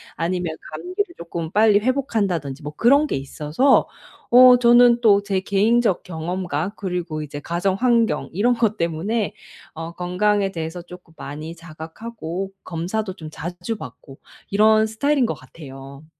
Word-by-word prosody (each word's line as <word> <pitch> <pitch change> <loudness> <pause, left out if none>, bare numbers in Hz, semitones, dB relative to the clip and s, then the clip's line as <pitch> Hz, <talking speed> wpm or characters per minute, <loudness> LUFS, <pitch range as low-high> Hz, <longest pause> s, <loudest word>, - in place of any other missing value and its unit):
아니면 175 -1 -2 0.2
감기를 365 0 -4
쪼끔 170 -1 -5
빨리 210 0 +4
회복한다든지 205 - -1
뭐 150 - -5
그런 280 +6 +4
게 - - -2
있어서 150 - +1 0.4
어 250 +1 +8
저는 240 0 +6
또 205 -4 +5
제 200 -2 -1
개인적 205 +2 +1
경험과 175 0 -3
그리고 180 -5 -4
이제 145 -1 -7
가정 170 +5 -1
환경 230 -6 +1
이런 225 +8 +2
것 225 -3 0
때문에 180 +7 -1 0.4
어 165 +1 -7
건강에 195 +3 0
대해서 165 0 -5
쪼끔 180 -1 -14
많이 155 +4 -7
자각하고 170 +3 -7
검사도 185 +4 -3
좀 155 -4 -9
자주 175 +9 -5
받고 135 -8 -11 0.3
이런 215 +2 +4
스타일인 265 +5 +1
것 225 - -1
같아요. 135 0 -12
185 Hz, 305 characters per minute, -22 LUFS, 160-225 Hz, 0.4 s, 어